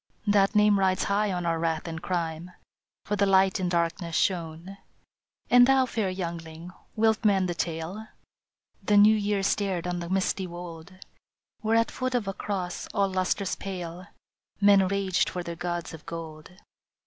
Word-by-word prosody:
" - - -37
That 195 +1 +3
name 210 -1 +5
rides 190 -1 +2
high 205 +1 +1
on 180 -1 -3
our 165 -1 0
wrath 165 0 -1
and 165 0 -5
crime, 170 -1 -3 0.6
For 210 - -1
the 200 0 +2
Light 190 +1 +4
in 180 -1 -1
darkness 170 0 -1
shone. 175 +1 -1 0.4
" - - -47
And 245 0 +7
thou, 265 -1 +4
fair 220 -5 -2
youngling, 170 -2 -6 0.2
wilt 220 0 +2
mend 195 -3 +3
the 175 - -2
tale? 170 +6 -4 0.4
" - - -43
The 210 - +4
New 210 +2 +7
Year 205 -2 0
stared 195 -3 0
on 175 0 -2
the 170 0 -6
misty 190 0 0
wold, 175 0 -9 0.7
Where 220 0 0
at 230 - +1
foot 255 0 -2
of 230 -5 -1
a 195 - -2
cross 185 -2 -4
all 200 -1 +2
lustrous 185 +1 -1
pale 180 -1 -6 0.5
Men 200 -2 +5
raged 195 -1 0
for 180 -1 -5
their 170 0 -6
gods 175 0 -4
of 160 - -10
gold. 160 -2 -8
185 Hz, 175 wpm, -27 LUFS, 170-200 Hz, 0.7 s, And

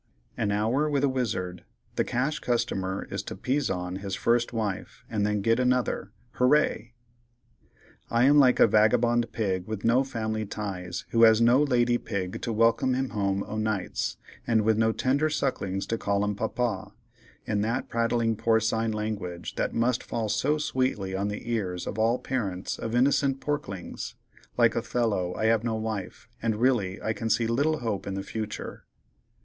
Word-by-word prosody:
An 100 - 0
Hour 115 +9 +1
with 140 -2 +1
a 140 - +4
Wizard.—The 95 -9 -3
Cash 135 +5 -1
Customer 95 -6 -1
is - - -2
to - - -7
"Pizon" 95 -10 -1
his 100 -1 -4
First 120 +2 +1
Wife, 110 -5 -4
and 105 -2 0
then 105 -1 0
get 115 +2 +3
Another. 125 -5 0 0.3
Hooray! 125 -3 +2 1.2
"I 115 +1 +3
am 145 +3 +6
like 130 -3 +5
a - - +8
vagabond 115 +2 +3
pig 95 -4 -2
with 110 -2 -4
no 120 +4 +4
family 110 -4 -3
ties, 95 -4 -5
who 115 - +3
has 110 -1 +7
no 120 +4 +5
lady 120 -4 +2
pig 95 -2 -4
to 115 - -2
welcome 115 +3 +3
him 130 0 -1
home 100 -2 -1
o'nights, 110 -3 -2 0.3
and 110 -2 +3
with 110 +1 +3
no 110 +1 +3
tender 140 +6 +1
sucklings 100 -10 -1
to 115 - -2
call 100 0 0
him 105 - 0
'papa,' 110 0 -2 0.5
in 105 -2 0
that 115 +3 -1
prattling 115 -1 +1
porcine 110 0 +1
language 105 -5 -4
that - - -2
must 120 +1 +1
fall 110 -2 -3
so 145 +9 +1
sweetly 130 -10 -1
on 100 +1 -1
the 105 +3 -5
ears 95 -6 -2
of 110 - -4
all 115 +3 +3
parents 100 -9 -3
of 115 +1 -3
innocent 135 +1 +3
porklings. 135 -12 -4 0.4
Like - - +4
Othello, 105 -7 -1
I 110 - -1
have 110 0 +3
no 115 -2 -1
wife, 110 -4 -5
and 110 -1 0
really 105 -6 +1
I 110 - 0
can 115 +1 -3
see 110 +2 +2
little 140 +7 +1
hope 110 -5 -2
in 95 - -3
the 95 - -3
future." 110 0 -6
110 Hz, 165 wpm, -27 LUFS, 100-125 Hz, 1.2 s, a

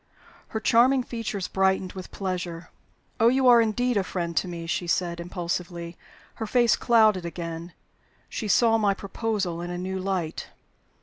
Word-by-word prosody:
Her 220 - -3
charming 250 +4 +4
features 225 -6 -4
brightened 190 -1 +1
with 185 -2 -8
pleasure. 180 -3 -5 0.5
"Oh, 225 - +5
you 260 +2 +3
are 240 -1 +8
indeed 235 +2 +1
a 200 - +2
friend 170 -2 -4
to - - +2
me!" 170 -1 -6
she 175 +1 -2
said, 170 0 0
impulsively. 170 -1 -4 0.5
Her 220 - -1
face 240 +1 +4
clouded 220 -6 +4
again 170 0 -6 0.5
she 215 - -4
saw 225 +2 +4
my 200 -2 +2
proposal 200 -4 -3
in 175 - -5
a 175 - -4
new 190 +1 -3
light. 185 -4 -3
190 Hz, 160 wpm, -26 LUFS, 175-225 Hz, 0.5 s, are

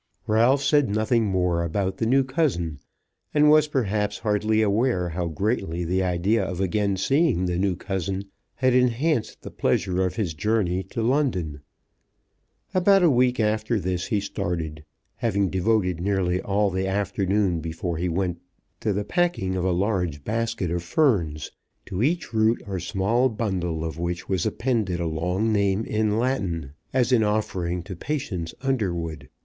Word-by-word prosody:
Ralph 120 +6 +3
said 145 -2 +3
nothing 110 +2 +1
more 90 -3 +1
about 95 +3 -1
the 115 - 0
new 135 +3 +4
cousin; 130 - -1 0.6
and 150 0 +6
was 155 0 +5
perhaps 105 -7 -1
hardly 110 0 +1
aware 105 -3 +1
how 85 +1 -2
greatly 90 -1 -1
the 90 +3 +1
idea 95 +4 +1
of 95 -1 -4
again 100 +1 0
seeing 135 - +2
the 90 -1 -1
new 95 -1 +1
cousin 95 +1 -3 0.3
had 130 -1 +2
enhanced 125 0 +1
the - - -8
pleasure 95 0 0
of 90 -1 -1
his 100 -8 -1
journey 95 +2 0
to 115 +4 -4
London. 110 - 0 1.1
About 195 +1 +4
a 170 - +6
week 125 0 +2
after 110 +1 +1
this 90 -1 -2
he 105 - +1
started, 85 -5 -4 0.3
having 100 -4 0
devoted 95 -2 +1
nearly 95 -2 0
all 100 0 +1
the 95 +1 -1
afternoon 95 -1 0
before 80 +1 -4
he 90 +2 -1
went 90 0 -2 0.4
to 105 - 0
the 100 +1 -2
packing 170 - 0
of 90 - -1
a 95 - +2
large 90 -6 -1
basket 115 -4 -2
of 85 0 -1
ferns, 85 - +1 0.3
to 95 0 -4
each 160 +1 0
root 110 +1 +3
or 95 -2 -3
small 110 +8 +1
bundle 90 -8 -2
of 80 0 -5
which 85 0 -3
was 95 -4 0
appended 110 -8 -1
a 85 - -1
long 90 +7 0
name 100 +1 +1
in 110 0 0
Latin, 95 - -1 0.2
as 130 -1 +1
an 125 -3 +5
offering 95 -5 -1
to 95 0 -7
Patience 90 - -4
Underwood. 85 - -2
100 Hz, 160 wpm, -24 LUFS, 90-115 Hz, 1.1 s, and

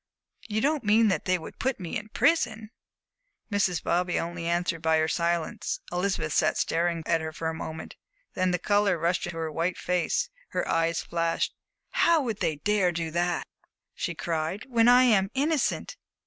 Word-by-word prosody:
"You 215 -1 -1
don't 295 0 +1
mean 215 +1 +4
that 185 -6 -1
they 185 0 +2
would 160 - -10
put 265 -2 -1
me 175 -3 -5
in 215 0 -4
prison?" 225 -6 +1 0.8
Mrs. 190 -6 +1
Bobby 180 +1 +1
only 170 0 -4
answered 170 -1 0
by 160 -1 +3
her 155 0 +2
silence. 170 0 -1
Elizabeth 175 -4 -1
sat 155 -2 +2
staring 170 0 0
at 165 -1 +1
her 160 0 -4
for 160 +1 -3
a - - -3
moment, 160 0 -7 0.4
then 185 0 +1
the 180 - +1
color 205 0 +2
rushed 170 +3 0
into 175 -1 -6
her 160 -1 -3
white 165 +4 -1
face, 180 - 0 0.3
her - - 0
eyes 165 0 +1
flashed. 165 -1 -1 0.4
"How 335 -1 +4
would 225 -5 -3
they 155 - 0
dare 195 +3 +1
do 165 -1 -3
that," 175 +1 0 0.5
she - - -3
cried, 165 +4 -2
"when 235 -2 +4
I 250 +1 +7
am 205 -6 +4
innocent?" 300 - 0
175 Hz, 175 wpm, -27 LUFS, 165-210 Hz, 0.8 s, I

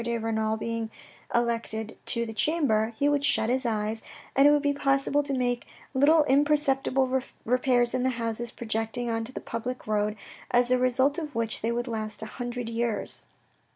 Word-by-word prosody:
de 235 0 -1
Renal 220 -1 -1
being 230 0 -3 0.5
elected 230 -2 -1
to 235 -1 +1
the 225 - -6
chamber, 230 -5 +2
he 285 - +2
would 290 -1 +2
shut 240 -5 +3
his 260 0 0
eyes, 220 0 -1 0.3
and 275 +1 +7
it - - +7
would 295 0 +3
be 285 0 +2
possible 275 +1 +2
to 285 -1 -4
make 245 -2 -1 0.3
little 300 +4 +5
imperceptible 270 -2 +2 0.2
repairs 245 0 +2
in 255 - 0
the 260 - +2
houses 235 -1 -2
projecting 225 +1 -3
on 225 0 -1
to 230 - -7
the - - -5
public 250 +2 -5
road, 210 0 0 0.3
as 245 0 +3
the 255 0 +3
result 260 +4 +2
of 300 -5 -6
which 230 -1 -2
they 225 - 0
would 240 +1 -2
last 215 -2 -4
a 220 +3 -8
hundred 245 -1 -3
years. 230 -1 -2
240 Hz, 185 wpm, -27 LUFS, 225-270 Hz, 0.5 s, and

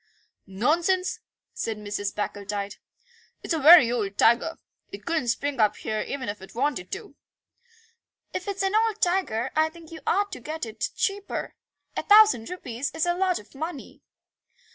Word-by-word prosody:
"Nonsense," 335 - +1 0.3
said 225 -1 -3
Mrs. 205 -1 -4
Packletide; 205 -1 -4 0.7
"it's - - -1
a 320 - 0
very 300 -5 +9
old 205 -5 -2
tiger. 235 +8 +3 0.3
It - - -9
couldn't 325 -7 -1
spring 275 +3 -1
up 210 -1 +4
here 215 0 -3
even 275 -4 -4
if 205 -1 -5
it 190 - -13
wanted 250 -8 -1
to." - - -7 1.2
"If 365 - -4
it's 395 -1 -2
an 385 +1 0
old 440 -1 +2
tiger 345 - 0
I 315 +1 +3
think 330 0 -15
you 325 - -8
ought 405 +2 +1
to - - -6
get 310 +3 -5
it 220 -1 -4
cheaper. 400 0 -2 0.4
A - - -1
thousand 415 - +6
rupees 275 -7 -4
is 320 - +1
a 350 - +2
lot 365 0 +1
of 210 - -13
money." 300 0 -7
290 Hz, 165 wpm, -26 LUFS, 220-355 Hz, 1.2 s, very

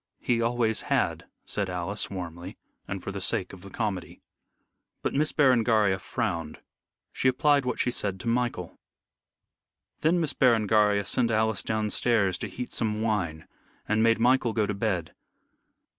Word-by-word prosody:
"He 120 -1 0
always 115 -1 +1
had," - - 0 0.2
said 100 -2 -2
Alice, 90 +3 -2
warmly, 90 -1 -7 0.3
and 100 -2 -5
for - - -4
the 100 0 -6
sake 95 0 -1
of 95 - -11
the 100 - -11
comedy. 100 -4 -4 0.8
But - - -1
Miss 150 +2 +1
Berengaria 115 -8 +3
frowned. 90 -8 -3 0.5
She - - 0
applied 140 +2 +3
what 125 - -2
she 125 - +1
said 100 -5 -2
to - - -7
Michael. 115 -7 -1 1.2
Then 170 +3 +2
Miss 160 -4 -1
Berengaria 105 -4 +3
sent 120 +5 +1
Alice 110 -1 +1
downstairs 110 -2 +1
to - - -3
heat 125 -1 -6
some 110 -1 0
wine, 90 -8 -2 0.4
and 110 +1 +2
made 115 0 +4
Michael 120 0 +3
go 110 -2 +1
to 105 - -2
bed. 95 -5 -2
110 Hz, 150 wpm, -27 LUFS, 95-120 Hz, 1.2 s, made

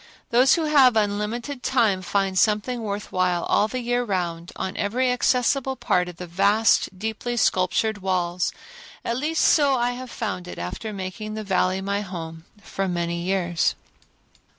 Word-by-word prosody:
Those 250 +3 +5
who 335 - -1
have 275 -6 +5
unlimited 220 +5 -1
time 225 -9 +2
find 195 +1 0
something 215 +5 +1
worth 205 -1 -4
while 180 -2 +1
all 210 - +2
the 255 +3 -4
year 245 +1 0
round 175 -5 -3
on 190 - -4
every 250 +5 0
accessible 255 +2 +1
part 180 -7 0
of 175 - -11
the 180 - -6
vast 200 +2 +2
deeply 220 +4 -3
sculptured 195 +2 +1
walls. 180 -2 -1 0.5
At 235 - -1
least 315 +4 0
so 285 -3 +4
I 240 0 +1
have 250 +1 -7
found 200 -7 -4
it - - -8
after 90 - -5
making 200 +2 -6
the 215 - -4
Valley 190 -1 +1
my 200 +1 -1
home 165 -4 -7 0.2
for 195 - -3
years. 175 -1 0
205 Hz, 155 wpm, -24 LUFS, 185-240 Hz, 0.5 s, Those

